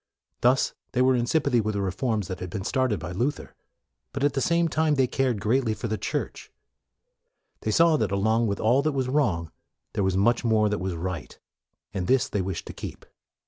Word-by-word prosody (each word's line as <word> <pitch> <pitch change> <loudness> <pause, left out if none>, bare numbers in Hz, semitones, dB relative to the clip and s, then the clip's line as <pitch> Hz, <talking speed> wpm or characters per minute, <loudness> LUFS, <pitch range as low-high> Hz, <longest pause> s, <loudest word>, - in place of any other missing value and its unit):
Thus 125 +2 +3 0.2
they 125 - +3
were 130 0 +4
in 120 -1 0
sympathy 140 -5 +2
with 110 0 -2
the 100 - 0
reforms 105 +1 -1
which 95 -1 -5
had 90 - -5
been 95 +1 -4
started 130 -1 0
by 90 - -6
Luther. 125 +11 -2 0.6
But, 140 - -3
at 145 -1 +3
the 135 - -1
same 170 +4 +2
time, 155 -1 +1
they 135 -2 +3
cared 125 -3 0
greatly 115 +2 +1
for 115 - -4
the 110 - -1
Church. - - -4 1.1
They - - -3
saw 165 +7 +4
that - - 0
along 110 +4 +2
with 100 -1 -2
all 120 +5 +3
that 155 +1 0
was 130 -2 -1
wrong, 100 - 0 0.4
there 105 - 0
was 95 0 +1
much 120 +5 +3
more 110 -2 +3
that 105 - -1
was 95 -1 -3
right. 85 -1 -5 0.6
And 95 -3 -2
this 130 -1 +3
they 100 - -1
wished 95 -2 -4
to - - -8
keep. - - -8
115 Hz, 210 wpm, -26 LUFS, 100-135 Hz, 1.1 s, were